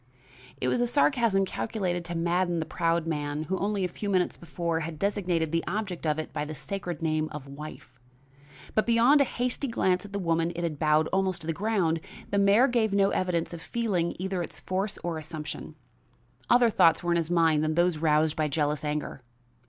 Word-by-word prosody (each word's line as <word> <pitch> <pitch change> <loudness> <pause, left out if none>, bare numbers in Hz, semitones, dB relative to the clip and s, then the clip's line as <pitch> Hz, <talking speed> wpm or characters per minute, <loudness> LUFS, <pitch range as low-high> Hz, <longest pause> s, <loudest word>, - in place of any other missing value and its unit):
It 125 - -1
was 240 - +1
a 245 - +2
sarcasm 235 -7 +3
calculated 185 -3 -2
to 170 0 -4
madden 175 +1 +1
the 160 - -2
proud 165 0 0
man 150 -1 -2
who, 190 +4 -2
only 200 -1 0
a - - +2
few 200 +4 -5
minutes 185 -2 +1
before, 170 0 -3
had 160 -1 -5
designated 180 -4 0
the 165 0 0
object 185 -4 -3
of 150 0 +1
it 155 - -5
by 150 - -2
the 155 +1 -6
sacred 170 +2 -5
name 155 -1 0
of 150 -2 -7
wife. 140 -3 -10 0.7
But 215 - +1
beyond 240 +5 +5
a - - +5
hasty 250 +3 -2
glance 185 -6 +1
at 205 - -11
the 200 - -3
woman 165 -2 0
it 175 - -3
had 155 -4 -3
bowed 155 0 +3
almost 190 -1 0
to - - -9
the 165 - 0
ground, 190 -4 0 0.3
the 200 - +2
mayor 200 +6 +5
gave 230 -5 +1
no 200 0 +3
evidence 175 -2 -1
of 170 - -7
feeling 185 -4 -1
either 190 0 -2
its 170 - -6
force 195 +2 -2
or 170 -2 -2
assumption. 155 -1 -7 0.7
Other 240 -1 +5
thoughts 165 -5 +4
were 175 - 0
in 170 - +3
his 165 -1 -1
mind 165 -3 +3
than 155 0 0
those 175 -2 +2
roused 155 0 +2
by 155 -1 +1
jealous 150 0 -1
anger. 150 -2 -3
170 Hz, 205 wpm, -28 LUFS, 155-200 Hz, 0.7 s, beyond